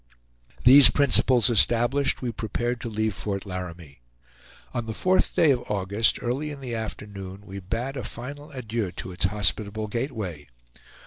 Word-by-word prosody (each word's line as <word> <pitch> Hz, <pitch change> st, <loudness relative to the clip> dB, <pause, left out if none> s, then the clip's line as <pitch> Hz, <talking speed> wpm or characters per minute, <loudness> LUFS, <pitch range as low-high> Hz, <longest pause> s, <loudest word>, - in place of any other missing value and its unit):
These 135 Hz, +2 st, +9 dB
principles 130 Hz, -3 st, +4 dB
established, 120 Hz, +6 st, +3 dB
we 120 Hz, -, -2 dB
prepared 120 Hz, +2 st, -3 dB
to 120 Hz, -, -5 dB
leave 110 Hz, -1 st, -1 dB
Fort 100 Hz, +1 st, -4 dB
Laramie. 85 Hz, -7 st, -8 dB, 0.7 s
On 115 Hz, -1 st, -3 dB
the 110 Hz, -, -5 dB
fourth 185 Hz, 0 st, +1 dB
day 155 Hz, -, +4 dB
of 125 Hz, -2 st, 0 dB
August, 100 Hz, +2 st, +1 dB
early 130 Hz, +5 st, -2 dB
in 145 Hz, -2 st, -8 dB
the 130 Hz, -3 st, -6 dB
afternoon, 100 Hz, -3 st, -7 dB
we 100 Hz, 0 st, -8 dB
bade 115 Hz, +8 st, -4 dB
a 130 Hz, -, -5 dB
final 140 Hz, +7 st, -8 dB
adieu 115 Hz, -7 st, -4 dB
to 95 Hz, -, -7 dB
its 90 Hz, +1 st, 0 dB
hospitable 105 Hz, +2 st, +1 dB
gateway. 105 Hz, -, -5 dB
110 Hz, 150 wpm, -25 LUFS, 100-125 Hz, 0.7 s, These